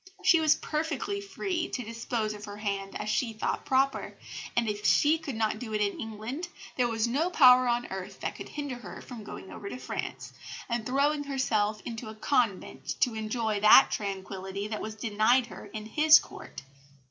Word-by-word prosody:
She 340 Hz, -, +6 dB
was 310 Hz, -1 st, +4 dB
perfectly 320 Hz, +6 st, -2 dB
free 385 Hz, -3 st, -3 dB
to 250 Hz, -, -3 dB
dispose 230 Hz, -1 st, -3 dB
of 210 Hz, 0 st, -8 dB
her 205 Hz, 0 st, -8 dB
hand 200 Hz, -2 st, -3 dB
as 210 Hz, -, -4 dB
she 225 Hz, +2 st, 0 dB
thought 215 Hz, -, -2 dB
proper; 270 Hz, 0 st, +1 dB, 0.4 s
and 235 Hz, -1 st, +3 dB
if 210 Hz, -1 st, -3 dB
she 305 Hz, +8 st, +4 dB
could 295 Hz, -6 st, -5 dB
not 220 Hz, -1 st, 0 dB
do 220 Hz, -3 st, -4 dB
it -, -, +1 dB
in 205 Hz, -1 st, 0 dB
England, 225 Hz, +9 st, -5 dB, 0.3 s
there 250 Hz, -2 st, +2 dB
was 225 Hz, 0 st, 0 dB
no 290 Hz, +9 st, +1 dB
power 255 Hz, -6 st, +7 dB
on 240 Hz, 0 st, +1 dB
earth 190 Hz, -1 st, -6 dB
that -, -, -2 dB
could -, -, -9 dB
hinder 285 Hz, -4 st, -5 dB
her 240 Hz, -, -9 dB
from 240 Hz, -4 st, -9 dB
going 190 Hz, -, -9 dB
over 200 Hz, -, -7 dB
to -, -, -6 dB
France, -, -, -5 dB, 0.3 s
and 235 Hz, -2 st, -2 dB
throwing 290 Hz, +3 st, +1 dB
herself 215 Hz, -6 st, 0 dB
into 225 Hz, -2 st, -6 dB
a 220 Hz, -, -9 dB
convent 225 Hz, -4 st, -1 dB
to 245 Hz, -, +3 dB
enjoy 220 Hz, -1 st, -1 dB
that 215 Hz, +5 st, +8 dB
tranquillity 195 Hz, 0 st, -4 dB
that 215 Hz, -, -3 dB
was 215 Hz, 0 st, -5 dB
denied 220 Hz, +3 st, +2 dB
her -, -, -10 dB
in 215 Hz, -1 st, -7 dB
his 305 Hz, +7 st, +7 dB
Court! -, -, -8 dB
230 Hz, 190 wpm, -29 LUFS, 215-270 Hz, 0.4 s, that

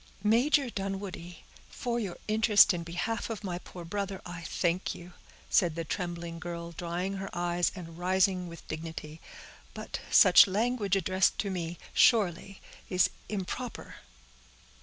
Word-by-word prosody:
"Major 245 Hz, +5 st, +3 dB
Dunwoodie, 195 Hz, -4 st, -5 dB, 0.3 s
for 240 Hz, -1 st, -2 dB
your 195 Hz, -6 st, -4 dB
interest 215 Hz, -2 st, +6 dB
in 175 Hz, -, -3 dB
behalf 175 Hz, +9 st, -3 dB
of 220 Hz, -3 st, -5 dB
my 180 Hz, -3 st, -3 dB
poor 175 Hz, -1 st, -10 dB
brother, 195 Hz, +1 st, -3 dB
I 175 Hz, -1 st, -7 dB
thank 175 Hz, +2 st, -1 dB
you," 175 Hz, +1 st, -12 dB, 0.3 s
said 170 Hz, -4 st, +3 dB
the 165 Hz, 0 st, -3 dB
trembling 170 Hz, -1 st, -4 dB
girl, 170 Hz, 0 st, -6 dB
drying 175 Hz, +3 st, -3 dB
her 195 Hz, 0 st, -5 dB
eyes, 175 Hz, 0 st, 0 dB
and 165 Hz, -2 st, -9 dB
rising 185 Hz, 0 st, +2 dB
with 170 Hz, -1 st, -11 dB
dignity; 160 Hz, 0 st, -7 dB, 0.5 s
"but -, -, -5 dB
such 185 Hz, -3 st, +8 dB
language 210 Hz, 0 st, 0 dB
addressed 190 Hz, 0 st, +2 dB
to 200 Hz, -, -3 dB
me, 170 Hz, -2 st, -4 dB, 0.2 s
surely, 195 Hz, -3 st, +3 dB, 0.3 s
is 185 Hz, 0 st, +3 dB, 0.2 s
improper." 215 Hz, +5 st, -5 dB
180 Hz, 140 wpm, -30 LUFS, 170-200 Hz, 0.5 s, such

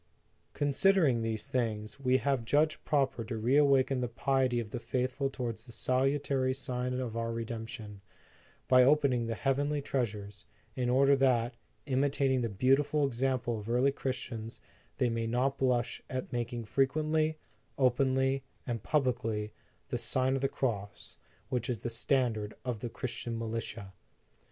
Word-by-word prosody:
"Considering 145 Hz, -3 st, +3 dB
these 110 Hz, -1 st, -2 dB
things, 110 Hz, -2 st, -2 dB
we 130 Hz, -1 st, +3 dB
have 135 Hz, -3 st, 0 dB
judged 150 Hz, +6 st, +2 dB
proper 135 Hz, -5 st, +1 dB
to 115 Hz, +1 st, -4 dB
reawaken 135 Hz, +2 st, +3 dB
the 125 Hz, -, 0 dB
piety 130 Hz, 0 st, +1 dB
of 110 Hz, -3 st, -5 dB
the 120 Hz, -, -3 dB
faithful 130 Hz, +3 st, -1 dB
towards 120 Hz, -4 st, -4 dB
the -, -, -10 dB
salutary 130 Hz, +1 st, +1 dB
sign 125 Hz, -1 st, -2 dB
of 120 Hz, -3 st, -4 dB
our 115 Hz, 0 st, -1 dB
Redemption, 110 Hz, -3 st, -6 dB, 0.7 s
by 130 Hz, 0 st, +7 dB
opening 130 Hz, -3 st, +3 dB
the 115 Hz, -, -2 dB
heavenly 145 Hz, +4 st, 0 dB
treasures, 105 Hz, -7 st, -3 dB, 0.3 s
in 125 Hz, -1 st, 0 dB
order 140 Hz, +2 st, +5 dB
that, 125 Hz, -3 st, +2 dB, 0.3 s
imitating 135 Hz, -1 st, +1 dB
the 115 Hz, -, -1 dB
beautiful 135 Hz, +7 st, +2 dB
example 125 Hz, -2 st, -1 dB
of 105 Hz, -, -9 dB
the 115 Hz, -, -1 dB
early 130 Hz, +3 st, +4 dB
Christians, 125 Hz, -4 st, -5 dB, 0.4 s
they 125 Hz, -, +2 dB
may 115 Hz, -1 st, -1 dB
not 130 Hz, +4 st, 0 dB
blush 125 Hz, -2 st, +1 dB
at 130 Hz, -1 st, -4 dB
making 120 Hz, -1 st, -3 dB
frequently, 155 Hz, +6 st, +1 dB, 0.4 s
openly, 135 Hz, +1 st, +2 dB, 0.2 s
and 120 Hz, -4 st, -3 dB
publicly 115 Hz, -6 st, 0 dB, 0.4 s
the -, -, -2 dB
Sign 130 Hz, +1 st, +1 dB
of 135 Hz, -, -2 dB
the 135 Hz, -, +1 dB
Cross, 105 Hz, -6 st, -4 dB, 0.3 s
which 125 Hz, -1 st, -2 dB
is 120 Hz, -5 st, -2 dB
the 120 Hz, -, -3 dB
standard 115 Hz, -4 st, 0 dB
of 125 Hz, -4 st, -2 dB
the 120 Hz, -, -4 dB
Christian 120 Hz, -1 st, -4 dB
militia. 115 Hz, -4 st, -5 dB
125 Hz, 145 wpm, -31 LUFS, 115-135 Hz, 0.7 s, by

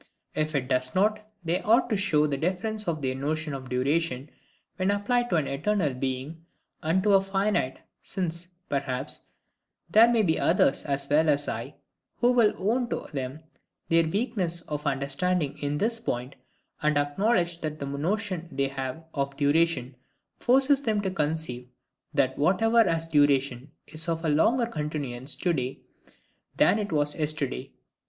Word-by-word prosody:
If 155 Hz, 0 st, -1 dB
it 130 Hz, -2 st, 0 dB
does 130 Hz, -1 st, 0 dB
not, 215 Hz, +3 st, +3 dB, 0.2 s
they 175 Hz, +3 st, 0 dB
ought 230 Hz, +4 st, +4 dB
to -, -, +3 dB
show 170 Hz, -7 st, +2 dB
the 145 Hz, -2 st, 0 dB
difference 190 Hz, +8 st, -2 dB
of 155 Hz, -4 st, -2 dB
their 130 Hz, -1 st, 0 dB
notion 150 Hz, +3 st, -2 dB
of 130 Hz, -2 st, -6 dB
duration, 135 Hz, +2 st, 0 dB, 0.5 s
when 185 Hz, +1 st, +1 dB
applied 240 Hz, +4 st, +1 dB
to -, -, +1 dB
an 155 Hz, -4 st, +2 dB
eternal 150 Hz, +2 st, 0 dB
Being, 135 Hz, +5 st, -4 dB, 0.4 s
and 170 Hz, +4 st, +1 dB
to 205 Hz, -1 st, +4 dB
a 195 Hz, -, +6 dB
finite; 195 Hz, -7 st, 0 dB, 0.2 s
since, 175 Hz, -2 st, -4 dB, 0.2 s
perhaps, 135 Hz, 0 st, -3 dB, 0.7 s
there 230 Hz, +2 st, +7 dB
may 230 Hz, -2 st, +3 dB
be 160 Hz, -5 st, +1 dB
others 165 Hz, -5 st, +3 dB
as 140 Hz, 0 st, -1 dB
well 155 Hz, +2 st, +3 dB
as 145 Hz, 0 st, +2 dB
I, -, -, -4 dB, 0.4 s
who 245 Hz, +1 st, +4 dB
will 235 Hz, -4 st, +5 dB
own 235 Hz, +5 st, 0 dB
to -, -, -4 dB
them 135 Hz, +2 st, -4 dB, 0.5 s
their 165 Hz, 0 st, +5 dB
weakness 190 Hz, -3 st, -1 dB
of 150 Hz, -2 st, -4 dB
understanding 140 Hz, +3 st, 0 dB
in 145 Hz, 0 st, -1 dB
this 230 Hz, +6 st, 0 dB
point, 125 Hz, -, -3 dB, 0.5 s
and 150 Hz, -1 st, +2 dB
acknowledge 170 Hz, +4 st, +1 dB
that 155 Hz, -1 st, -3 dB
the 140 Hz, -, -5 dB
notion 175 Hz, +5 st, -2 dB
they 135 Hz, 0 st, 0 dB
have 135 Hz, +3 st, -5 dB
of 140 Hz, -1 st, -2 dB
duration 145 Hz, -3 st, +2 dB, 0.4 s
forces 270 Hz, +3 st, +4 dB
them 220 Hz, -6 st, 0 dB
to 190 Hz, -, -1 dB
conceive, 150 Hz, -7 st, -2 dB, 0.4 s
that 130 Hz, 0 st, +1 dB
whatever 225 Hz, +9 st, +4 dB
has 165 Hz, -1 st, 0 dB
duration, 140 Hz, -4 st, +2 dB, 0.2 s
is 160 Hz, +2 st, -5 dB
of 165 Hz, 0 st, -2 dB
a -, -, +2 dB
longer 230 Hz, -, +3 dB
continuance 150 Hz, -, -4 dB
to 175 Hz, -, 0 dB
day 130 Hz, -3 st, -3 dB, 0.8 s
than 215 Hz, -, +4 dB
it 205 Hz, -3 st, -3 dB
was 145 Hz, -1 st, +1 dB
yesterday. 145 Hz, -4 st, -2 dB
160 Hz, 160 wpm, -27 LUFS, 140-195 Hz, 0.8 s, there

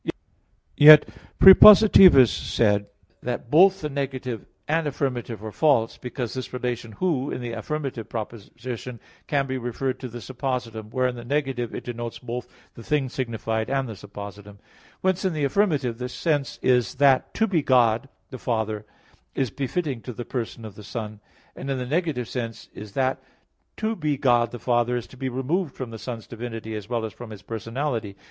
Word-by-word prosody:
Yet 150 Hz, 0 st, +10 dB, 0.3 s
Prepositivus 190 Hz, -, +9 dB
said 105 Hz, -3 st, +1 dB, 0.3 s
that 120 Hz, -1 st, -5 dB
both 190 Hz, +5 st, +6 dB
the 150 Hz, -, -3 dB
negative 130 Hz, -5 st, -4 dB, 0.2 s
and 160 Hz, 0 st, +1 dB
affirmative 125 Hz, -6 st, -3 dB
are 110 Hz, -, -5 dB
false, 135 Hz, -4 st, +2 dB
because 125 Hz, -2 st, -5 dB
this 130 Hz, -1 st, -5 dB
relative 120 Hz, -3 st, -4 dB
"Who" 150 Hz, -, -1 dB
in -, -, -4 dB
the 120 Hz, -1 st, -5 dB
affirmative 135 Hz, -5 st, -4 dB
proposition 120 Hz, +2 st, -7 dB, 0.3 s
can 140 Hz, -2 st, +1 dB
be 130 Hz, -1 st, -3 dB
referred 130 Hz, +2 st, -3 dB
to 130 Hz, -, -6 dB
the 120 Hz, 0 st, -9 dB
suppositum; 120 Hz, -3 st, -4 dB
whereas 130 Hz, +2 st, 0 dB
in 125 Hz, -, -10 dB
the 120 Hz, -, -8 dB
negative 135 Hz, -2 st, -2 dB
it -, -, -6 dB
denotes 120 Hz, -1 st, -6 dB
both 125 Hz, -1 st, -6 dB, 0.3 s
the -, -, -12 dB
thing 135 Hz, +2 st, 0 dB
signified 115 Hz, -3 st, -3 dB
and 135 Hz, -1 st, 0 dB
the 110 Hz, -, -6 dB
suppositum. 100 Hz, 0 st, -10 dB, 0.4 s
Whence, 190 Hz, 0 st, 0 dB
in 190 Hz, -2 st, 0 dB
the 150 Hz, -2 st, -2 dB
affirmative 140 Hz, -, +1 dB
the 125 Hz, 0 st, -4 dB
sense 145 Hz, +1 st, -1 dB
is 125 Hz, -3 st, +2 dB
that 135 Hz, -1 st, +3 dB
"to 220 Hz, -, +2 dB
be 185 Hz, -7 st, +1 dB
God 125 Hz, -1 st, +3 dB, 0.2 s
the 130 Hz, -, -7 dB
Father" 110 Hz, -3 st, -2 dB, 0.5 s
is 130 Hz, -4 st, -1 dB
befitting 140 Hz, -2 st, -3 dB
to 125 Hz, -, -7 dB
the 120 Hz, +1 st, -7 dB
person 115 Hz, -2 st, -5 dB
of 110 Hz, -, -9 dB
the 105 Hz, -, -12 dB
Son; 105 Hz, 0 st, -6 dB, 0.4 s
and 140 Hz, -, -7 dB
in 135 Hz, -, -1 dB
the 125 Hz, -, -3 dB
negative 145 Hz, -4 st, -1 dB
sense 115 Hz, -3 st, -6 dB
is 105 Hz, -1 st, -10 dB
that 130 Hz, +1 st, 0 dB, 0.6 s
"to 220 Hz, +1 st, -1 dB
be 150 Hz, -6 st, -1 dB
God 120 Hz, -4 st, +3 dB
the 120 Hz, -, -7 dB
Father," 120 Hz, 0 st, +1 dB
is 120 Hz, -, -3 dB
to -, -, -16 dB
be 130 Hz, +1 st, -3 dB
removed 135 Hz, +6 st, -2 dB
from 125 Hz, -3 st, -6 dB
the 110 Hz, -, -8 dB
Son's 115 Hz, -2 st, -6 dB
divinity 115 Hz, -1 st, -7 dB
as 105 Hz, -1 st, -7 dB
well 115 Hz, -2 st, -1 dB
as 110 Hz, -, -7 dB
from 120 Hz, -2 st, -10 dB
His 105 Hz, -2 st, -11 dB
personality. 115 Hz, -2 st, -4 dB
125 Hz, 180 wpm, -24 LUFS, 115-140 Hz, 0.6 s, Yet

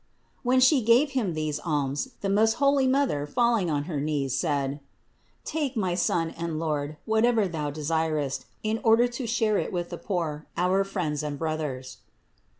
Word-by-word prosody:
When 255 Hz, +1 st, +3 dB
She 260 Hz, +1 st, +5 dB
gave 240 Hz, +6 st, +4 dB
Him 220 Hz, -11 st, -1 dB
these 155 Hz, -1 st, -2 dB
alms 150 Hz, -, -1 dB
the 200 Hz, -, -1 dB
most 220 Hz, +3 st, +4 dB
holy 275 Hz, +1 st, +3 dB
Mother 260 Hz, -, +1 dB
falling 230 Hz, 0 st, +2 dB
on 145 Hz, -2 st, 0 dB
her 150 Hz, -2 st, -3 dB
knees, 140 Hz, -3 st, -1 dB
said: 140 Hz, -1 st, -1 dB, 0.7 s
"Take, 290 Hz, -5 st, -2 dB
my 185 Hz, -4 st, 0 dB
Son 165 Hz, -2 st, 0 dB
and 165 Hz, -1 st, -4 dB
Lord, 150 Hz, -2 st, -2 dB
whatever 220 Hz, -1 st, +3 dB
Thou 155 Hz, -4 st, -3 dB
desirest, 155 Hz, -1 st, -1 dB, 0.2 s
in 220 Hz, +1 st, 0 dB
order 230 Hz, +2 st, +5 dB
to 240 Hz, 0 st, -5 dB
share 220 Hz, -2 st, +1 dB
it -, -, -3 dB
with 175 Hz, -1 st, -3 dB
the 175 Hz, -, -5 dB
poor, 160 Hz, -6 st, -3 dB
our 185 Hz, +2 st, +2 dB
friends 175 Hz, -7 st, -2 dB
and 150 Hz, -1 st, -4 dB
brothers." 150 Hz, -5 st, -4 dB
175 Hz, 165 wpm, -26 LUFS, 150-230 Hz, 0.7 s, She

